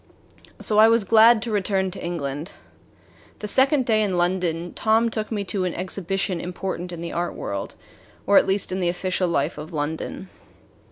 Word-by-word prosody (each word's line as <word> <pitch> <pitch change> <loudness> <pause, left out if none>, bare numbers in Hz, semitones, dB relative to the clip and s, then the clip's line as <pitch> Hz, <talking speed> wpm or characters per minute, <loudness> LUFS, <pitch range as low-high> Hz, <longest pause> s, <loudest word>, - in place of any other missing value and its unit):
So 210 -1 +2
I 220 - +8
was 230 -1 +4
glad 225 +2 +6
to 235 - -4
return 195 -2 0
to 195 - -9
England. 155 -1 -4 0.8
The 210 - -6
second 265 +4 +3
day 220 -2 +2
in 195 -4 0
London, 175 -1 -1
Tom 225 +1 +2
took 220 -1 -4
me 210 -2 -1
to 195 0 -2
an 180 - -2
exhibition 185 -1 -2
important 180 0 -5
in 170 -1 -7
the 170 - -5
art 175 0 -2
world, 100 0 -5 0.5
or 200 - +3
at - - -1
least 195 0 +1
in 185 - -2
the 175 -2 +1
official 180 +1 -1
life 150 -1 -1
of 155 +3 -8
London. 155 +5 -4
190 Hz, 180 wpm, -23 LUFS, 175-215 Hz, 0.8 s, I